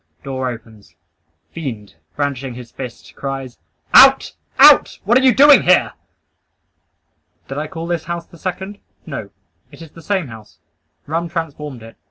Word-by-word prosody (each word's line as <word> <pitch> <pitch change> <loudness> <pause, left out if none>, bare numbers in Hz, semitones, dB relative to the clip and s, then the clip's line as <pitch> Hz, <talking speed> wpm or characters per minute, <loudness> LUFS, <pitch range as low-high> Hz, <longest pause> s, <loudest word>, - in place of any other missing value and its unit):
Door 130 -1 -3
opens. 110 -6 -12 0.6
Fiend, 120 -11 -7 0.2
brandishing 140 -3 -3
his 125 -1 -11
fist, 125 -3 -10
cries 135 -2 -6 0.3
"Out! - - +7 0.2
Out! - - +6
What 225 +5 +2
are - - -1
you 260 -1 +5
doing 280 +3 +7
here!" 180 0 +3 1.5
Did 135 +2 -5
I 155 - -4
call 165 +1 -7
this 170 -1 -3
house 170 0 -5
the 170 - -18
second? 190 +2 -6 0.3
No; - - -7 0.4
it - - -15
is 165 -2 -12
the 165 - -14
same 185 -3 -2
house. 110 -2 -14 0.5
Rum 165 +3 -3
transformed 150 -6 -6
it. 115 - -14
150 Hz, 150 wpm, -18 LUFS, 125-170 Hz, 1.5 s, Out